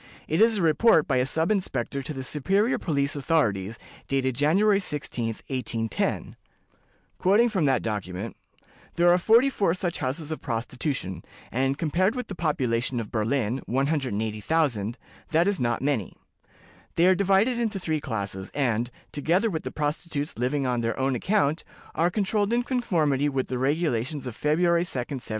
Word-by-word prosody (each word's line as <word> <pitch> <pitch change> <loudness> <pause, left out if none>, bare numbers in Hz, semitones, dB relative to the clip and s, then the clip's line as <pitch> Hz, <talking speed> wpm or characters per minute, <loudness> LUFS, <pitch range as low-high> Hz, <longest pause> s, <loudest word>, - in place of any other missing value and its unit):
It 160 +6 +1
is 225 -1 +5
a 190 - 0
report 165 +1 +4
by 130 - +2
a 125 +1 +2
sub 160 +7 +1
inspector 140 - -1
to 135 - -5
the 135 -3 -5
superior 195 - +1
police 140 -4 0
authorities, 115 - 0 0.3
dated 130 -1 0
January 195 - +3
16, 130 - -3
1810. 115 -4 -2 2.6
"There 175 0 +4
are 175 - +6
forty 230 +8 +5
four 195 -8 +1
such 180 -2 -3
houses 145 +4 -3
of 155 - -4
prostitution, 120 - -3 0.3
and, 135 +3 0
compared 185 - +1
with 250 - -4
the - - -4
population 130 -7 0
of 110 - -6
Berlin, 115 +2 0
180,000, 125 -2 0 0.3
that 165 +3 +3
is 200 -2 +1
not 120 +1 0
many. 135 -9 -1 0.8
They 170 - +4
are 185 - +6
divided 200 +6 +2
into 225 -4 -1
three 160 -5 -2
classes, 100 -5 -4
and, 120 -4 0 0.2
together 175 +9 +1
with 160 - -2
the - - -5
prostitutes 150 0 -2
living 130 +4 0
on 125 -2 0
their 115 0 -1
own 135 0 +1
account, 160 - +1 0.3
are 170 +2 +2
controlled 205 +2 0
in 240 +1 +2
conformity 160 - +1
with 135 -2 -2
the 125 - -2
regulations 140 -1 0
of 125 -3 -5
February 170 +4 +2
2d, 175 - -5 0.3
1792. - - -8
145 Hz, 150 wpm, -26 LUFS, 125-175 Hz, 2.6 s, are